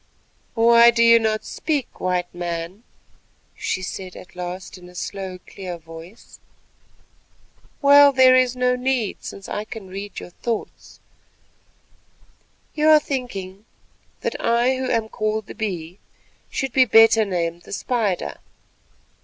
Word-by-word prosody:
"Why 235 +1 +6
do 235 0 +3
you 230 0 +7
not 220 -1 -1
speak, 295 -6 -3
White 180 -1 -1
Man?" 175 +2 -5 0.7
she 185 - -3
said 185 0 -6
at 180 - -13
last 180 +2 -6
in 180 0 -14
a 180 - -17
slow 190 0 -5
clear 185 -3 -7
voice. 165 +5 -13 1.4
"Well, 285 0 +8
there 260 -1 +6
is 255 -1 +3
no 250 0 +1
need, 250 -4 -2
since 195 - -8
I 210 - -3
can 215 -3 -10
read 200 +2 -7
your - - -11
thoughts. 230 +4 -6 1.7
You 305 0 +2
are 310 -1 +8
thinking 215 -9 -5 0.6
that - - -2
I 240 +3 +2
who 260 0 -3
am 225 -1 0
called 215 0 -2
the - - -10
Bee 180 -4 -5 0.5
should 270 -2 -3
be 260 0 +5
better 225 0 +6
named 170 -4 -2
the - - -15
Spider. 215 -4 -2
215 Hz, 135 wpm, -22 LUFS, 185-245 Hz, 1.7 s, Well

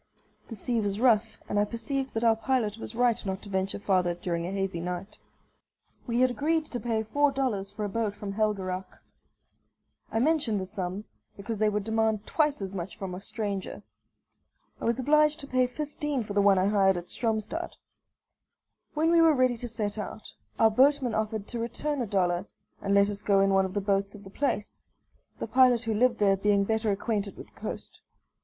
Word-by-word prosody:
The 225 - -7
sea 230 +3 -1
was 200 0 -2
rough, 225 -3 +2
and 205 - 0
I - - +4
perceived 260 +5 -3
that 225 - -1
our 225 -1 +5
pilot 225 -2 -1
was 225 - -7
right 240 -1 +2
not 190 -1 -4
to 205 - -10
venture 190 0 -1
farther 185 -3 +1
during 170 -1 -3
a - - -4
hazy 195 -3 -2
night. 180 +4 -5 0.9
We 240 +1 +1
had 255 0 +4
agreed 315 +5 0
to 245 - -4
pay 225 -2 -1
four 285 +6 +2
dollars 230 -8 -1
for 210 +1 -4
a - - -3
boat 215 -1 -1
from 205 -1 -5
Helgeraac. 195 -3 -2 1.1
I - - -1
mention 270 -4 +2
the 190 - -2
sum, 185 0 -4 0.3
because 210 +2 -5
they 215 0 +3
would 210 -1 -1
demand 220 -1 0
twice 295 -8 +1
as 190 0 -5
much 185 0 -5
from 190 -2 -5
a 180 - -6
stranger. 200 -2 -4 1.0
I - - -3
was 235 0 +2
obliged 300 +3 +3
to 280 - -9
pay 255 -2 +2
fifteen 295 -1 -3
for 205 - -6
the 200 - +3
one 200 -1 +5
I 185 - +3
hired 195 -2 +3
at 175 0 -6
Stromstad. 225 +8 -2 1.2
When 320 +2 +2
we 340 -1 +6
were 325 -2 +6
ready 255 -2 +3
to 240 +1 -6
set 215 -2 -3
out, 210 +1 -7 0.2
our 220 0 +5
boatman 265 +1 +3
offered 215 -1 -2
to 240 - -4
return 265 +5 -2
a 235 - -2
dollar 185 -1 0 0.3
and 200 0 +1
let 200 +1 +4
us 205 - -5
go 200 -1 +3
in 195 0 +3
one 195 0 +4
of 190 +1 -6
the 205 - +1
boats 200 0 0
of 205 - -12
the 195 - -12
place, 210 -4 -2 0.5
the - - -3
pilot 250 -2 +4
who 225 -1 -1
lived 240 +2 +3
there 200 -2 +4
being 200 0 +3
better 220 +1 0
acquainted 205 0 -2
with - - -11
the - - -20
coast. - - -7
215 Hz, 205 wpm, -28 LUFS, 195-245 Hz, 1.2 s, we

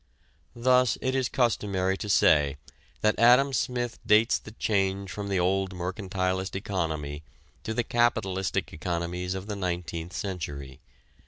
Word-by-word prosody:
Thus 125 0 +3
it 130 - -1
is 130 -2 0
customary 100 -6 +1
to 105 - -5
say 75 -6 +4 0.4
that 105 0 +2
Adam 125 +4 +6
Smith 120 -2 -1
dates 110 +1 +4
the - - -11
change 100 -3 -1
from 100 0 -5
the 95 -2 +1
old 95 +1 0
mercantilist 95 +1 -2
economy 80 -7 -3 0.4
to 110 - -4
the 120 - +1
capitalistic 110 -6 0
economics 90 +3 -3
of 95 0 -5
the 105 -1 -4
nineteenth 85 -2 -4
century. 70 -9 -5
95 Hz, 135 wpm, -27 LUFS, 90-110 Hz, 0.4 s, Adam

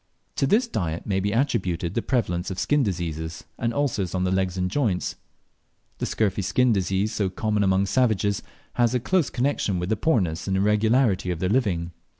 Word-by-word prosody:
To 135 - +2
this 235 - +3
diet 85 - -3
may 95 -2 0
be 100 +2 -1
attributed 95 - 0
the 115 - 0
prevalence 95 -9 -1
of 95 - -5
skin 145 +9 +2
diseases, 80 - -3 0.2
and 115 - 0
ulcers 115 -10 -1
on 90 - 0
the 90 - +1
legs 95 -1 0
and 90 0 0
joints. 105 -8 0 0.8
The - - -1
scurfy 100 -2 0
skin 115 +6 +3
disease 95 +2 0
so 100 -3 0
common 105 +2 0
among 95 0 +3
savages 105 -3 +1 0.3
has 120 0 +2
a - - +2
close 175 +5 +1
connexion 120 -7 0
with 90 +1 -3
the 110 - +2
poorness 100 - 0
and 95 0 +1
irregularity 105 0 +2
of 90 - -1
their 90 +3 -1
living. 95 -8 0
100 Hz, 185 wpm, -25 LUFS, 90-120 Hz, 0.8 s, this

